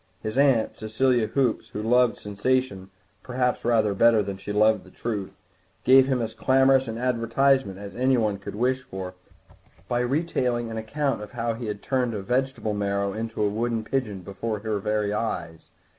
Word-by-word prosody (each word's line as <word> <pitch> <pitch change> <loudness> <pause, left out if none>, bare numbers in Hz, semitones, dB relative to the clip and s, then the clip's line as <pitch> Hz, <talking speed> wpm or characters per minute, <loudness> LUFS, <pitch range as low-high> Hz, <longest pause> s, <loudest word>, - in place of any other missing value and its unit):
His 110 +1 -3
aunt, 135 -5 +2
Cecilia 115 +1 +1
Hoops, 130 -3 0
who 105 - -5
loved 125 +1 +3
sensation 105 -2 -1 0.3
perhaps 125 0 -1
rather 110 -3 +2
better 115 +1 +4
than 100 0 -4
she 100 +2 -7
loved 105 +1 +3
the - - -16
truth, 105 -5 -4 0.5
gave 130 +1 +6
him 130 -3 0
as 110 0 -4
clamorous 135 +1 +3
an 115 0 -4
advertisement 125 -2 +1
as 100 -1 -9
anyone 120 -5 +1
could 100 - -7
wish 130 +3 +1
for 95 -6 -7 0.7
by 120 - 0
retailing 125 -3 0
an 110 - -5
account 135 +4 -2
of 105 - -9
how 115 -1 -1
he 115 0 -6
had 105 -1 -5
turned 125 -4 0
a 100 - -3
vegetable 125 -1 -1
marrow 100 -1 -1
into 110 0 -3
a - - +3
wood 115 +1 -1
pigeon 110 -7 -2
before 105 +4 -4
her 110 -1 -2
very 105 0 -1
eyes. 85 -7 -3
115 Hz, 175 wpm, -25 LUFS, 105-125 Hz, 0.7 s, gave